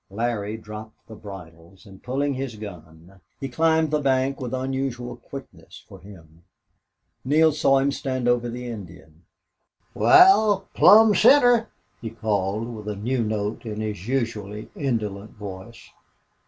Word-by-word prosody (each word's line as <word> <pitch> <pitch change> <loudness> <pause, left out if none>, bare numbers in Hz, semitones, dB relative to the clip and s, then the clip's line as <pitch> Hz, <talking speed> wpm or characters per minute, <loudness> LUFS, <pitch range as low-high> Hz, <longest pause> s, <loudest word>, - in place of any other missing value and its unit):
Larry 110 0 -3
dropped 110 0 -11
the 110 - -11
bridles 90 -3 -12
and, 95 -2 -15
pulling 140 +3 -1
his 130 -3 -5
gun, 90 -3 -12 0.2
he 135 - -4
climbed 160 +3 +1
the 150 - +1
bank 135 -1 0
with 125 -2 -4
unusual 130 -2 -3
quickness 120 -12 -12
for - - -13
him. 85 -5 -16 0.8
Neale 155 +4 +4
saw 140 -2 +2
him 135 +1 +1
stand 130 -2 -3
over 120 0 +1
the 125 +1 -6
Indian. 90 -7 -10 0.7
"Wal, 220 - +5
plumb 220 0 +7
center!" 240 +1 +5 0.3
he 115 - -5
called, 110 +1 -2
with 105 -1 -10
a 105 - -3
new 120 +4 -1
note 105 0 -3
in 110 -2 -6
his 105 -2 -5
usually 110 -5 -3
indolent 110 -7 -3
voice. 105 +2 -10
115 Hz, 140 wpm, -23 LUFS, 100-135 Hz, 0.8 s, plumb